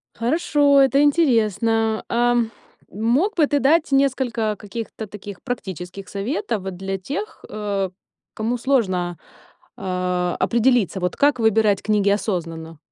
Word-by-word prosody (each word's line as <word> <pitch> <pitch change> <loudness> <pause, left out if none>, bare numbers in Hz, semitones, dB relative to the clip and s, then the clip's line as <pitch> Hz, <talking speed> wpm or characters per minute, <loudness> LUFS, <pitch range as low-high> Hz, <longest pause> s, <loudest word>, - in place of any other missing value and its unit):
Хорошо, 285 +2 +3
это 275 +1 +4
интересно. 225 - +2
Ам, 240 -1 +2 0.4
мог 245 - +1
бы 305 -3 +4
ты 285 - +1
дать 300 +2 +3
несколько 250 -5 +1
каких-то 220 +1 -7
таких 205 -1 -9
практических 190 - -6
советов 220 - -3
для 195 +1 -4
тех, 290 - -6
э, 200 -2 -2 0.4
кому 225 +3 -2
сложно, 190 -10 0 0.6
а, 180 -1 -1
определиться: 235 -5 +2
вот 180 -1 -2
как 285 -3 +3
выбирать 220 -3 +3
книги 210 -2 +2
осознанно? 165 -6 -2
220 Hz, 115 wpm, -22 LUFS, 195-265 Hz, 0.6 s, это